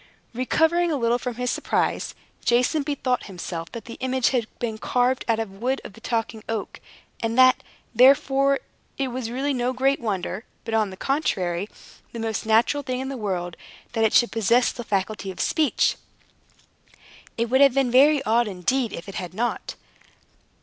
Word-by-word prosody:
Recovering 320 +8 +2
a - - +1
little 240 -2 +1
from 250 -2 -4
his 250 +1 -1
surprise, - - -1 0.3
Jason 250 +6 +2
bethought 275 -3 -1
himself 175 -3 -6
that 230 -3 -8
the 230 - -9
image 260 -1 +1
had 240 -4 0
been 225 -2 -3
carved 250 +2 +1
out 230 -1 +2
of 220 -3 -3
the 195 - -15
wood 260 +4 0
of - - -10
the 225 - -16
Talking 225 -2 -2
Oak, 220 -3 -4 0.4
and 225 +1 -2
that, 255 0 +6 0.3
therefore, 275 +2 +4 0.4
it 270 -1 -1
was 245 -2 -4
really 270 +4 -1
no 250 0 0
great 270 +2 +1
wonder, 200 -2 -3 0.2
but 225 - -4
on 215 -2 +2
the 190 - -10
contrary, 195 - -1 0.4
the 235 - -5
most 220 -1 -3
natural 230 +6 +3
thing 255 -2 -3
in 265 0 -4
the 275 - -4
world, 180 -7 -3 0.4
that 225 -1 +1
it 220 - +2
should 240 - +5
possess 230 +3 +3
the 240 - -7
faculty 200 -1 -2
of 185 - -8
speech. 310 -3 +2 1.4
It 230 0 -1
would 260 +1 +4
have 275 -2 +6
been 270 -3 +2
very 280 +3 +5
odd, 230 +2 +2
indeed, 215 +5 -1
if 170 - -7
it 195 - -7
had 180 0 -8
not. 240 +3 -2
240 Hz, 180 wpm, -24 LUFS, 220-260 Hz, 1.4 s, that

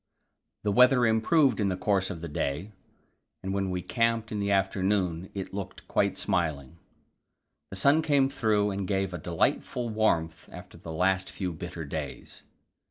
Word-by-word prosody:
The 105 - +1
weather 125 +3 +6
improved 120 +3 +3
in 100 -2 +2
the 90 - -2
course 95 -2 +1
of 80 - -6
the 85 - -5
day, 75 +6 -3 0.7
and 95 +1 -2
when 100 -1 -1
we 90 -1 -3
camped 115 +2 0
in 105 - -2
the 100 0 -1
afternoon 95 -2 +1
it 95 -1 -5
looked 100 -1 -7
quite - - +1
smiling. 80 -2 -1 0.9
The - - -7
sun 140 +10 +4
came 145 -4 +3
through 110 -6 +1
and 95 -1 -3
gave 95 -1 -1
a 85 - -4
delightful 120 +9 -1
warmth 85 -7 0
after - - -11
the 80 - -8
last 95 +3 +1
few 90 -3 -4
bitter 85 0 -6
days. 70 - -6
95 Hz, 165 wpm, -28 LUFS, 90-110 Hz, 0.9 s, weather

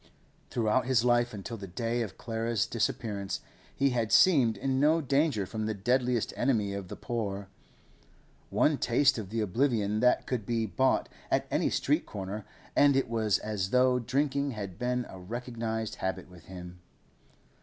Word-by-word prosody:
Throughout 120 +2 +1
his 125 -3 +3
life 120 0 +3
until 105 +3 -6
that 95 -3 -10
day 120 0 -1
of 110 -5 -5
Clara's 115 -1 -1
disappearance 100 -4 -2 0.4
he 140 -1 +2
had 115 -3 -1
seemed 135 -12 +5
in 135 0 0
no 155 +3 +4
danger 140 -6 +1
from 110 +3 -4
the 110 - -1
deadliest 120 +3 +1
enemy 110 -6 +1
of 100 -2 -5
the - - -7
poor; 100 -4 -4 1.0
one 150 -2 +2
taste 135 +1 +3
of 100 -4 -6
the 115 +1 -1
oblivion 110 -1 +1
that 125 +2 +3
could 125 -4 -2
be 115 +1 0
bought 130 +5 +1 0.2
at - - +1
any - - +2
street - - 0
corner, 100 +1 -6 0.3
and 145 -1 +5
it 135 -3 +1
was 110 -3 +2
as 105 -3 -3
though 125 +1 +4
drinking 140 +3 0
had 100 -4 -6
been 125 0 0
a 95 - -10
recognised 115 +1 -4
habit 95 0 -3
with 90 -2 -15
him. 90 -1 -9
115 Hz, 165 wpm, -29 LUFS, 100-125 Hz, 1.0 s, seemed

